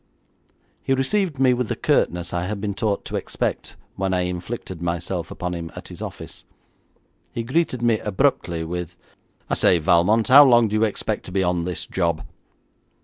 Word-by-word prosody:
He 135 - +1
received 160 +4 0
me 130 -1 +4
with 125 -1 -1
the - - -2
curtness 90 0 0
I 90 +1 -1
had 105 0 -3
been 100 0 -2
taught 100 0 -1
to - - -5
expect - - -3 0.2
when 95 -1 0
I 90 - +1
inflicted 90 0 -5
myself 85 +1 -3
upon 90 0 -4
him 85 -1 -6
at - - -9
his - - -10
office. - - -8 0.9
He 115 - -3
greeted 130 -1 0
me 115 -2 +3
abruptly 95 -6 0
with, 90 0 -5 0.5
'I - - -2
say, 90 - +4
Valmont, 90 +7 +3
how 140 +3 +10
long 120 -4 +5
do 105 - -2
you 110 +1 +3
expect 110 0 -3
to - - -7
be 95 0 +1
on 90 -1 0
this 90 -2 -3
job?' 85 -3 -1
95 Hz, 180 wpm, -23 LUFS, 90-120 Hz, 0.9 s, how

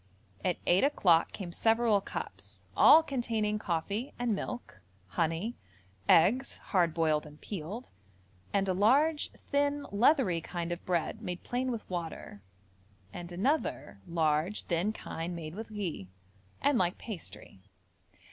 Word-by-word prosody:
At 180 - +1
eight 180 +2 +4
o'clock 180 - +4
came 185 -4 -6
several 225 +1 +3
cups, - - -8
all 320 - +8
containing 225 -7 -1
coffee 200 - -2
and 245 -2 0
milk, 205 - -5 0.3
honey, 165 - -1 0.5
eggs, 225 +11 +4
hard 175 -5 +1
boiled 155 -2 +1
and 150 0 -14
peeled, 200 +5 -6 0.6
and 195 -1 +1
a 185 - +2
large 280 - +3 0.2
thin 285 0 +1
leathery 205 - +3
kind 175 0 -4
of 175 - -4
bread 175 -3 -1
made 180 0 -5
plain 255 +1 -1
with 230 -3 -4
water, 165 - -5 0.7
and 175 0 -7
another 205 - -1
large 165 +3 +1
thin 175 +4 0
kind 170 -4 -5
made 160 -2 -6
with 220 +4 -7
ghi, 185 - -4 0.6
and 280 -3 +4
like 180 -1 +1
pastry. 175 - -9
195 Hz, 130 wpm, -31 LUFS, 170-235 Hz, 0.7 s, all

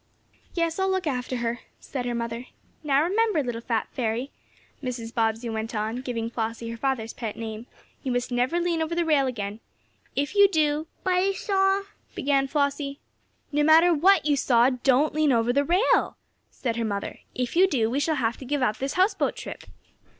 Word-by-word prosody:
"Yes, 335 0 0
I'll 380 0 +2
look 375 -2 0
after 255 -3 -2
her," 235 +1 -1 0.2
said 250 -3 -5
her 240 - -1
mother 235 +1 -4 0.4
"Now 285 -1 +3
remember, 400 -2 +2
little 240 -2 -4
fat 230 -2 -1
fairy," 245 +1 -2 0.5
Mrs. 240 -3 -5
Bobbsey 225 +1 0
went 225 0 -4
on, 215 +2 -2
giving 245 -3 -3
Flossie 230 0 -4
her - - -5
father's 235 -3 -1
pet 225 -4 -5
name, 225 +1 -6 0.3
"you 260 - -2
must 245 +1 -1
never 250 +8 +1
lean 340 -2 0
over 320 +1 -1
the 340 0 +1
rail 290 -4 +3
again. 210 -4 -4 0.6
If 285 +4 -1
you 405 -1 +7
do 310 -3 +1
" - - -39
"But 370 - +1
I 375 +2 +2
saw 390 0 +1
" - - -34
began 275 -1 +1
Flossie. 280 0 -1 0.5
"No 295 0 +1
matter 320 +3 +6
what 370 +5 +4
you 295 -1 +3
saw 245 -2 +4
don't 265 +3 +2
lean 305 -1 +3
over 235 0 +2
the 280 +2 +3
rail!" 360 - +2 0.3
said 235 -3 -3
her 230 - 0
mother. 200 -2 -3 0.2
"If 250 +2 -2
you 375 +3 +6
do, 245 -11 +1
we 255 +5 0
shall 315 +2 +1
have 235 -4 0
to - - -10
give 285 +1 -1
up 215 -3 +1
this 270 +1 -2
houseboat 375 +4 +2
trip." - - -8
270 Hz, 195 wpm, -26 LUFS, 235-315 Hz, 0.6 s, you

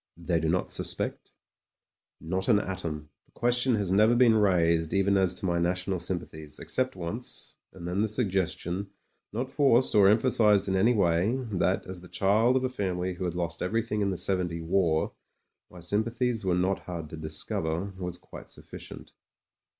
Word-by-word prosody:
They 85 0 0
do 80 - -1
not 90 +2 0
suspect - - -1 0.4
?" - - -65
'Not 95 +4 -3
an 110 - +5
atom. 85 -7 -4 0.2
The - - -31
question 120 +1 +2
has 100 -4 -1
never 110 +5 +4
been 120 -2 +5
raised 85 -5 +2
even 100 +1 +3
as 95 -2 +2
to 95 - -3
my 85 -1 +1
national 90 +2 0
sympathies, 80 -4 -5
except 130 0 -1
once, 95 +8 -4 0.2
and 85 -2 -9
then 90 +3 -1
the 110 - +2
suggestion 95 -3 -1 0.2
— - - -48
^not 125 +5 -3
forced 135 -4 +3
or 100 -2 +6
emphasised 105 -3 +4
in 95 - 0
any 110 +6 +3
way 90 +2 +2
— 130 - -2
^that, 95 0 0
as 95 -1 -8
the 90 - -12
child 110 +7 +2
of 130 - +1
a - - +2
family 95 -7 -2
who 90 +1 -5
had 85 -1 -3
lost 85 -1 -3
every 115 +5 0
thing 105 -2 -2
in 100 - +1
the 95 - -2
'70 90 -3 -1
war, 80 -2 +1 0.6
my 90 - -13
sympathies 115 +5 -1
were 90 -2 +1
not 95 +2 +1
hard 85 -3 -5
to - - -6
discover, 80 +4 -3
was 90 -1 -4
quite - - -12
sufficient. - - -10
95 Hz, 185 wpm, -28 LUFS, 85-110 Hz, 0.6 s, or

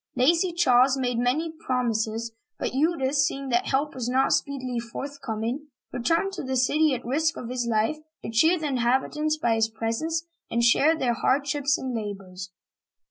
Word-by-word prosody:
Lazy 335 +8 +3
Charles 265 -5 +4
made 245 -2 -1
many 285 +7 0
prom 255 -6 -1
ises, 220 +1 -2 0.3
but - - -3
Eudes, 285 -1 +1
seeing 275 0 0
that 240 -1 +1
help 285 +2 0
was 245 -2 -3
not 260 +2 +2
speedily 255 -4 -1
forth 280 +5 -7
coming, 230 +6 -3 0.3
returned 330 +10 0
to 390 - -4
the 265 -1 -3
city 290 +3 +3
at 250 - -7
the - - -10
risk 315 +5 +1
of 235 - -6
his 250 -1 -2
life, 225 +7 +1 0.2
to - - -5
cheer 320 +10 +4
the 315 - -4
inhabitants 275 +4 0
by 235 -7 +1
his 225 0 +1
presence 230 +10 -2 0.2
and 235 0 0
share 290 +7 +4
their 245 -5 +1
hardships 280 +3 +1
and 260 -1 -4
labors. 195 -4 -6
260 Hz, 180 wpm, -26 LUFS, 235-300 Hz, 0.3 s, Charles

